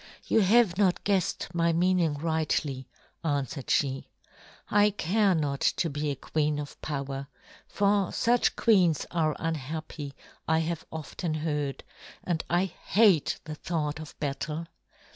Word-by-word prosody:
"You -, -, +3 dB
have 210 Hz, -2 st, +4 dB
not 190 Hz, -3 st, +2 dB
guessed 195 Hz, -3 st, 0 dB
my 170 Hz, 0 st, +2 dB
meaning 175 Hz, -2 st, +2 dB
rightly," 150 Hz, -3 st, -1 dB, 0.3 s
answered 145 Hz, -3 st, -2 dB
she. 135 Hz, -2 st, +1 dB, 0.6 s
"I 205 Hz, 0 st, +4 dB
care 200 Hz, 0 st, +2 dB
not 145 Hz, -3 st, -1 dB
to 165 Hz, -, +1 dB
be 145 Hz, +1 st, -2 dB
a 140 Hz, -, -1 dB
queen 150 Hz, +1 st, -1 dB
of 145 Hz, -1 st, -7 dB
power, 140 Hz, -2 st, -4 dB, 0.4 s
for 200 Hz, -2 st, +2 dB
such 240 Hz, +1 st, +2 dB
queens 185 Hz, -, +3 dB
are 155 Hz, -3 st, +1 dB
unhappy, 155 Hz, -2 st, -4 dB, 0.3 s
I 160 Hz, -, +3 dB
have 165 Hz, 0 st, -2 dB
often 160 Hz, +1 st, -4 dB
heard; 150 Hz, -3 st, -2 dB, 0.4 s
and 170 Hz, -3 st, -1 dB
I 175 Hz, +3 st, +3 dB
hate 190 Hz, -1 st, +2 dB
the 155 Hz, -, -6 dB
thought 155 Hz, -1 st, -3 dB
of 155 Hz, -2 st, -10 dB
battle. 150 Hz, +3 st, -3 dB
160 Hz, 135 wpm, -28 LUFS, 150-180 Hz, 0.6 s, have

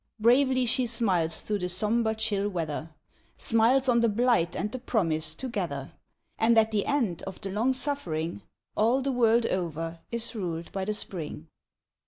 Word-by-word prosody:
Bravely 255 Hz, +3 st, +4 dB
she 250 Hz, +1 st, +1 dB
smiles 190 Hz, -9 st, 0 dB
through 210 Hz, -1 st, -2 dB
the 180 Hz, -1 st, -2 dB
somber 220 Hz, +4 st, +1 dB
chill 205 Hz, -2 st, 0 dB
weather, 165 Hz, -4 st, -3 dB, 0.5 s
Smiles 240 Hz, +4 st, +3 dB
on 240 Hz, -2 st, +4 dB
the 230 Hz, -1 st, +3 dB
blight 220 Hz, -6 st, +2 dB
and 210 Hz, +2 st, -2 dB
the 255 Hz, -, -5 dB
promise 165 Hz, -11 st, 0 dB
together; 175 Hz, -, -4 dB, 0.5 s
And 230 Hz, +1 st, +4 dB
at 220 Hz, 0 st, +4 dB
the 205 Hz, -2 st, 0 dB
end 240 Hz, -, 0 dB
of 190 Hz, -, -7 dB
the 195 Hz, -, -5 dB
long 230 Hz, +6 st, +1 dB
suffering 175 Hz, -, -3 dB, 0.3 s
All 235 Hz, +5 st, +2 dB
the 275 Hz, -, 0 dB
world 235 Hz, -2 st, +3 dB
over 165 Hz, -2 st, -3 dB
is 235 Hz, 0 st, -2 dB
ruled 170 Hz, -6 st, -4 dB
by 195 Hz, -1 st, -3 dB
the 210 Hz, +1 st, -1 dB
Spring. 160 Hz, -5 st, -5 dB
215 Hz, 165 wpm, -28 LUFS, 175-235 Hz, 0.5 s, Bravely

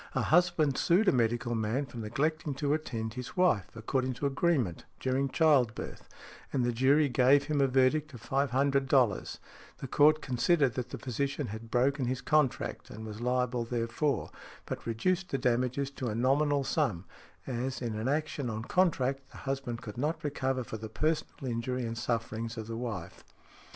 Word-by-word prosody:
A -, -, +1 dB
husband 155 Hz, -4 st, +3 dB
sued 190 Hz, +5 st, +3 dB
a -, -, +7 dB
medical 120 Hz, 0 st, +1 dB
man 115 Hz, +5 st, 0 dB
for 120 Hz, -2 st, -11 dB
neglecting 150 Hz, +6 st, -1 dB
to 140 Hz, +1 st, 0 dB
attend 115 Hz, -8 st, -3 dB
|73| -, -, -11 dB
his 125 Hz, +5 st, -7 dB
wife, 145 Hz, -, +3 dB
according 130 Hz, +3 st, -1 dB
to 135 Hz, -, -3 dB
agreement, 140 Hz, -, 0 dB
during 130 Hz, +1 st, 0 dB
childbirth, 135 Hz, -7 st, +1 dB, 0.4 s
and 130 Hz, -3 st, +1 dB
the 120 Hz, -, +1 dB
jury 135 Hz, +5 st, +4 dB
gave 130 Hz, +2 st, +4 dB
him 150 Hz, -2 st, 0 dB
a 135 Hz, -, +4 dB
verdict 135 Hz, +4 st, +2 dB
of 115 Hz, -, -11 dB
$500; 135 Hz, -3 st, +2 dB, 0.4 s
the 135 Hz, -, -6 dB
court 150 Hz, +4 st, +5 dB
considered 135 Hz, +1 st, +2 dB
that 125 Hz, -1 st, -4 dB
the -, -, -6 dB
physician 135 Hz, +3 st, -2 dB
had 110 Hz, +2 st, -7 dB
broken 130 Hz, +3 st, +2 dB
his 130 Hz, +1 st, -1 dB
contract 150 Hz, -2 st, 0 dB
and 110 Hz, +1 st, -8 dB
was 110 Hz, +1 st, -7 dB
liable 125 Hz, -1 st, 0 dB
therefor, 115 Hz, +5 st, -1 dB, 0.3 s
but -, -, -6 dB
reduced 180 Hz, +11 st, 0 dB
the 135 Hz, -, 0 dB
damages 125 Hz, +2 st, 0 dB
to 130 Hz, -2 st, -4 dB
a 105 Hz, -, -2 dB
nominal 140 Hz, +4 st, +2 dB
sum, 125 Hz, -, 0 dB, 0.4 s
as, 130 Hz, +1 st, -3 dB
in 120 Hz, -3 st, -3 dB
an 110 Hz, +3 st, -2 dB
action 145 Hz, -2 st, -1 dB
on 110 Hz, 0 st, -4 dB
contract, 135 Hz, -5 st, +1 dB
the -, -, -13 dB
husband 135 Hz, -4 st, -4 dB
could 105 Hz, +2 st, -7 dB
not 155 Hz, +4 st, -1 dB
recover 135 Hz, -3 st, -1 dB
for 110 Hz, -, -6 dB
the 110 Hz, 0 st, -7 dB
personal 155 Hz, +2 st, -2 dB
injury 125 Hz, +1 st, -2 dB
and 115 Hz, 0 st, -4 dB
sufferings 115 Hz, 0 st, -2 dB
of 110 Hz, -, -4 dB
the 115 Hz, +1 st, -5 dB
wife. 115 Hz, -8 st, -5 dB
130 Hz, 175 wpm, -30 LUFS, 115-145 Hz, 0.4 s, a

